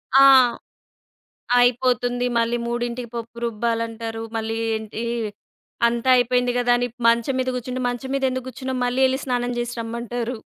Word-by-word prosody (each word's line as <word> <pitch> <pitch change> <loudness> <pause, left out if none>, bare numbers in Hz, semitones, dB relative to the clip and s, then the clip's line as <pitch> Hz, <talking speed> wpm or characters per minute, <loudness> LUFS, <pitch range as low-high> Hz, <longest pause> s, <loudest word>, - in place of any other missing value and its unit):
ఆ! 275 0 +9 1.3
అయిపోతుంది. 245 0 +2
మళ్ళీ 230 +1 +1
3కి 240 0 -3
పప్పు 235 0 -7
రుబ్బాలంటారు. 230 0 -2
మళ్ళీ, 225 0 -2 0.2
ఏంటి, 220 +1 -5 0.8
అంతా 235 +2 -1
అయిపోయింది 245 0 +2
కదా! 245 0 +2
అని 245 0 0 0.2
మంచం 235 +3 +2
మీద 255 0 0
కూర్చుంటే, 250 +1 -4
"మంచం 245 +2 -5
మీద 275 - -2
ఎందుకు 255 0 -4
కూర్చున్నావు? 260 0 -4
మళ్ళీ 250 +2 0
ఎళ్లి 260 +1 -1
స్నానం 245 -1 -1
చేసి 240 0 -3
రమ్మం"టారు. 235 +1 -4
245 Hz, 135 wpm, -22 LUFS, 230-250 Hz, 1.3 s, ఆ